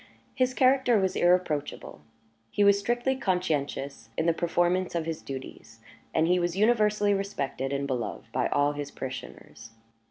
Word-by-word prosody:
His 255 -1 0
character 260 -3 +4
was 190 -2 0
irreproachable; 175 -5 0 0.5
he 205 - +1
was 200 0 +5
strictly 240 +5 0
conscientious 145 - -2
in 160 - 0
the 170 - +3
performance 175 +2 0
of 165 -2 -1
his 160 -1 -4
duties; 130 -4 -9 0.3
and 160 - +2
he 180 +1 +3
was 175 +1 -1
universally 210 -2 +3
respected 170 -9 -3
and 140 0 -1
beloved 125 -5 -3
by - - 0
all 145 0 +2
his 145 -1 -5
parishioners. 130 -3 -8
175 Hz, 150 wpm, -27 LUFS, 140-205 Hz, 0.5 s, was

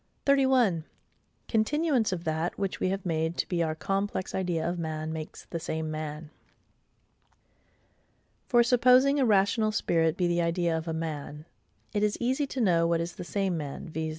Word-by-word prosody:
Continuance 255 +1 +1
of 175 -2 -3
that 160 +1 -2
which 195 -2 -2
we 185 - +1
have 195 0 -3
made 160 0 -1
to - - -1
be 175 -2 -1
our 160 -1 0
complex 195 +2 -2
idea 175 -4 -1
of 175 0 -2
man 155 -1 -3
makes 160 -1 -7
the 170 - -5
same 160 -1 -3
man. 155 0 -6 2.2
For, 240 -2 +5
supposing 255 +3 +5
a 265 - +3
rational 215 +2 +3
spirit 165 -5 +1
be 180 - +1
the 175 0 +1
idea 170 0 0
of 160 +1 -4
a - - -1
MAN, 155 -2 -5 0.5
it 205 - 0
is 210 0 +1
easy 260 +4 0
to 265 - -5
know 170 -7 +3
what 170 0 +1
is 170 +1 -3
the - - -7
same 195 0 -1
man, 145 +1 -6
viz. 160 0 -3
175 Hz, 170 wpm, -28 LUFS, 160-210 Hz, 2.2 s, For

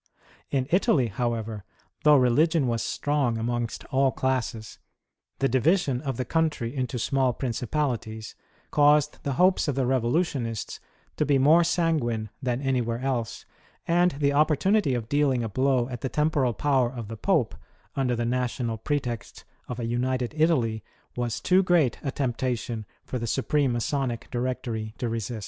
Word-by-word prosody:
In 135 -2 0
Italy, 175 - +3
however, 110 -1 -3 0.4
though 150 -1 +7
religion 145 +4 +3
was 115 -2 0
strong 145 -5 0
amongst 120 0 -3
all 135 0 +3
classes, 125 -5 -2 0.6
the 135 - +2
division 135 0 +2
of 135 -5 -3
the 125 - -2
country 150 -4 -1
into 125 -2 -2
small 130 +1 +1
principalities 115 -3 -3 0.4
caused 150 0 +3
the 140 - -2
hopes 185 +6 +3
of 145 - 0
the 135 -1 +1
revolutionists 125 - -1 0.4
to - - +2
be 145 -2 +3
more 155 +6 +5
sanguine 130 - 0
than 125 0 -2
anywhere 125 -4 0
else, 125 -3 -3 0.4
and 175 +1 +3
the 140 0 +1
opportunity 155 +2 +2
of 115 -3 -4
dealing 140 -3 +1
a 115 - -3
blow 130 +1 +1
at 125 -2 -6
the 130 - -2
temporal 150 -5 +1
power 130 0 +1
of 120 -4 -7
the 115 - -6
Pope - - +1 0.4
under 130 -3 +1
the 120 0 -1
national 120 -2 -1
pretext 120 -4 -3 0.2
of 125 -1 -5
a 120 - -2
united 125 +2 -1
Italy, 130 -9 +1 0.3
was 120 -3 -2
too 185 +1 +4
great 175 -8 +2
a 140 - -2
temptation 120 -4 -2 0.2
for 125 - -4
the 115 - -3
Supreme 135 +2 +1
Masonic 120 0 -2
Directory 120 -3 -3
to 120 - -2
resist. 115 0 -3
130 Hz, 155 wpm, -26 LUFS, 120-145 Hz, 0.6 s, though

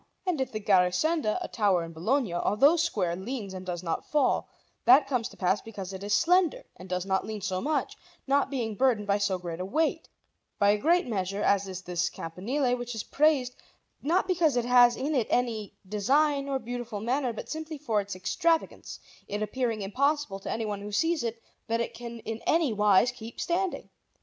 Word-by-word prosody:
And 350 -7 0
if 265 - -2
the 215 - -3
Garisenda, 210 - +2
a - - -4
tower 200 -6 +1
in 165 0 -8
Bologna, 220 - 0
although 220 - +4
square, 215 - 0
leans 200 +1 -5
and 185 0 -6
does 180 -1 -5
not 165 -2 -3
fall, 295 -2 +1 0.4
that 265 +4 +7
comes 250 -5 -1
to - - -16
pass 190 +2 +1
because 195 -4 -7
it 190 +1 -7
is 205 - -4
slender 350 - +3
and 185 +1 -12
does 180 0 -2
not 190 -1 0
lean 215 0 -6
so 185 -1 -2
much, 305 +3 -1 0.3
not 280 0 +2
being 240 -5 -2
burdened 230 -2 +2
by 200 0 +1
so 200 -2 +1
great 175 -2 -6
a 185 - -3
weight, 310 +10 0 0.5
by 200 0 +4
a 210 - +2
great 345 +8 +3
measure, 195 -3 -2
as 200 -1 +2
is 185 -1 -6
this 175 -2 -1
campanile, 245 - -2
which 245 -1 -5
is 220 - -3
praised, 280 -4 +2 0.5
not 350 +6 +1
because 330 -8 +2
it 240 - +1
has 245 -1 +6
in 285 +4 -1
it 250 -6 +1
any 230 -4 -1
design 275 +8 +1
or 270 - +1
beautiful 240 -3 -5
manner, 250 +4 0
but 225 - -7
simply 315 0 -5
for 230 -8 0
its 200 -1 -7
extravagance, 325 - -1 0.3
it 205 +1 -2
appearing 225 -1 -2
impossible 275 0 0
to - - -7
anyone 210 -3 -3
who 205 +1 -7
sees 325 +7 +1
it 230 0 -3 0.3
that 230 0 0
it 235 - -2
can 235 -1 -8
in 225 +1 -5
any 320 -7 +3
wise 210 +3 +4
keep 230 -1 -10
standing. 365 +2 -1
230 Hz, 200 wpm, -28 LUFS, 200-275 Hz, 0.5 s, that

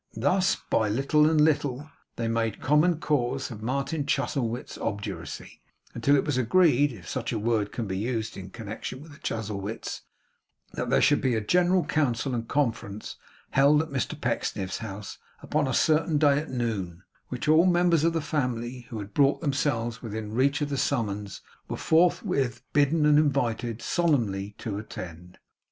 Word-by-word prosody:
Thus, 190 +1 +2
by 110 - 0
little 140 +7 +3
and 160 -1 +2
little, 145 -2 +1 0.3
they 115 - -2
made 115 -2 -1
common 155 +4 +3
cause 135 -2 -1
of 110 -2 -8
Martin 140 +5 -2
Chuzzlewit's 130 -4 -1
obduracy, 100 0 -5 0.3
until 140 +5 +3
it 140 - +2
was 145 -4 0
agreed 145 +1 +4
(if 95 -9 -11
such 120 -2 -3
a 115 - -1
word 110 -1 0
can 115 - -3
be 95 -1 -3
used 110 -1 -2
in 95 0 -8
connection 110 +4 -7
with 155 +2 -12
the 145 - -14
Chuzzlewits) 105 -1 -4 0.7
that - - -3
there - - +3
should 145 - +4
be 130 -4 +1
a - - +1
general 180 - +2
council 135 -3 0
and 115 -1 -3
conference 115 -7 -2 0.3
held 140 +2 +5
at 160 - -9
Mr 135 -2 -2
Pecksniff's 95 -1 -2
house 105 -2 -7 0.2
upon 150 -1 0
a - - -1
certain 155 +4 +2
day 145 -1 +4
at 155 - -6
noon; 100 -8 -3 0.2
which 125 +2 -5
all 160 +4 +6
members 175 -3 +3
of 165 0 +3
the 165 - 0
family 125 -4 -3
who 115 - -6
had 100 -1 -7
brought 140 +3 +3
themselves 135 -6 -1
within 110 -2 -5
reach 140 +5 +2
of 145 - -1
the 140 - -2
summons, 105 -7 -2 0.3
were - - -4
forthwith 160 -6 +2
bidden 150 +2 +3
and 150 0 +6
invited, 120 -6 0
solemnly, 105 - 0
to 100 -3 -4
attend. 90 -4 -9
130 Hz, 170 wpm, -27 LUFS, 110-150 Hz, 0.7 s, all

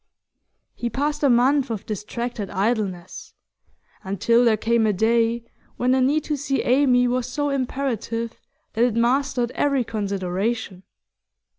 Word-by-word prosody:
He 240 - -3
passed 290 +5 -2
a 285 - +4
month 260 +3 +3
of 220 -4 -4
distracted 215 +1 -4
idleness, 195 -3 -3 0.7
until 215 +5 +2
there 225 -3 +3
came 225 +1 +2
a 210 - +2
day 230 +3 +1 0.3
when 250 +1 +1
the 260 0 +3
need 285 +4 +2
to 300 -1 -2
see 275 0 -1
Amy 250 -1 +3
was 245 0 -1
so 290 +3 -2
imperative 245 -4 -2 0.4
that 230 - +2
it 240 -3 +2
mastered 245 +1 +1
every 280 -3 +1
consideration. 200 -1 -3
235 Hz, 135 wpm, -23 LUFS, 220-260 Hz, 0.7 s, a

